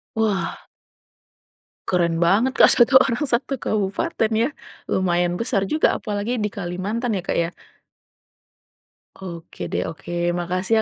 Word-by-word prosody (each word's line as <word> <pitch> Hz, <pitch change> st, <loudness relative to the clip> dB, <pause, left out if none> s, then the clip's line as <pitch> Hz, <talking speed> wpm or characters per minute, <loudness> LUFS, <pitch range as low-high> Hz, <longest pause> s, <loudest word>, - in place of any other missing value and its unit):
Wah. 215 Hz, -3 st, 0 dB, 1.3 s
Keren 170 Hz, -2 st, +1 dB
banget 225 Hz, +9 st, +2 dB
Kak, -, -, +8 dB
1 260 Hz, +2 st, +6 dB
orang, 260 Hz, -1 st, +2 dB
1 260 Hz, +1 st, -1 dB
kabupaten 215 Hz, -, -1 dB
ya, 230 Hz, +5 st, +2 dB, 0.4 s
lumayan 175 Hz, -1 st, +1 dB
besar 200 Hz, -5 st, -1 dB
juga 310 Hz, -, +3 dB
apalagi 215 Hz, +2 st, -2 dB
di 210 Hz, -, 0 dB
Kalimantan 200 Hz, +6 st, -3 dB
ya 190 Hz, -, -1 dB
Kak -, -, -2 dB
ya. 170 Hz, 0 st, +1 dB, 1.7 s
Oke 170 Hz, -, -10 dB
deh, 90 Hz, +1 st, -1 dB
oke, 165 Hz, +2 st, -8 dB, 0.3 s
makasih 185 Hz, +4 st, -1 dB
200 Hz, 120 wpm, -22 LUFS, 175-235 Hz, 1.7 s, Kak